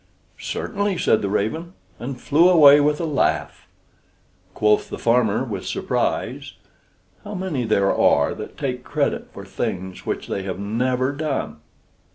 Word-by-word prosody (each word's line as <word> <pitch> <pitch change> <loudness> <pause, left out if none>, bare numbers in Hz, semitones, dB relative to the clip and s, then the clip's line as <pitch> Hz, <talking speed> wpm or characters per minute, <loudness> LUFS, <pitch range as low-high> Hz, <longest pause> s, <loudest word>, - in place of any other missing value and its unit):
"Certainly," 205 -3 -2
said 110 - +2
the 100 - -2
raven, 160 - -2 0.3
and 125 +2 -6
flew 160 +7 +4
away 150 -5 +8
with 150 +1 +1
a 170 - -1
laugh. 150 -3 -1 0.9
Quoth 105 0 +2
the - - -5
farmer 115 -1 +2
with 115 -6 -5
surprise, - - -2 0.7
"How - - -7
many 180 -10 -2
there 100 -3 +2
are 70 - +3
that - - -9
take 125 -2 -3
credit - - -2
for - - -10
things 95 0 -4
which - - -3
they 100 - -3
have 95 -1 -5
never 125 +6 0
done!" 145 - -3
125 Hz, 145 wpm, -22 LUFS, 105-155 Hz, 0.9 s, away